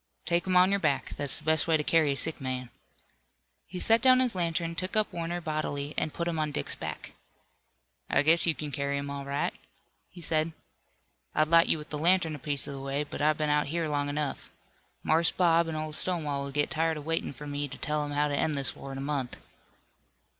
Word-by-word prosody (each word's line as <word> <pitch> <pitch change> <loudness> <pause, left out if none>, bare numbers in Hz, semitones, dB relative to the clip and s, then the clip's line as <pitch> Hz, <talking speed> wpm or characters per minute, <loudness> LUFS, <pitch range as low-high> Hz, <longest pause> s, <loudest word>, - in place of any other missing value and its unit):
"Take 170 +1 +1
him 185 -1 +3
on 185 +1 +6
your 200 - +2
back. 150 -6 0
That's 145 -1 -3
the - - -11
best 160 0 +2
way 160 -1 +4
to 150 - -2
carry 155 -2 +3
a 140 - -1
sick 160 0 +1
man." 130 -2 -4 1.0
He 180 +1 -6
set 225 +4 +4
down 255 -1 +6
his 255 -2 +2
lantern, 170 -2 -1
took 185 +3 -3
up 215 -1 +1
Warner 170 +1 -3
bodily 155 -3 -3
and 155 - -1
put 170 +2 -3
him 165 -2 -1
on 155 -1 0
Dick's 145 - -2
back. - - -6 1.0
"I 135 - +3
guess 165 +3 +5
you 165 - +3
can 150 0 -5
carry 140 0 -1
him 140 0 -4
all 140 -1 -5
right," 140 +1 -1 0.6
he 180 - -13
said. 160 -1 0 0.8
"I'd 155 0 +3
light 165 0 +6
you - - +3
with 150 0 -10
the 150 - -3
lantern 170 0 +3
a 150 - -6
piece 145 +1 -1
of - - -6
the 135 - -6
way, 135 +2 -2
but 145 - -7
I've 155 +1 +3
been 150 -1 0
out 150 0 +2
here 165 +2 -1
long 145 -1 -1
enough. 145 0 -3 0.5
Marse 165 +1 +4
Bob 170 -2 +3
an' 160 - -3
old 155 0 -4
Stonewall 150 -6 -1
will 140 - -6
get 145 +1 0
tired 160 0 0
waitin' 165 +2 -2
fur 145 +2 -10
me 145 0 -2
to 135 - -9
tell 150 0 -1
'em 145 - -4
how 145 +1 +1
to 145 - -1
end 155 +1 +1
this 135 -2 0
war 135 - -8
in 135 - -6
a - - -4
month." 140 -3 -2
155 Hz, 230 wpm, -29 LUFS, 145-165 Hz, 1.0 s, on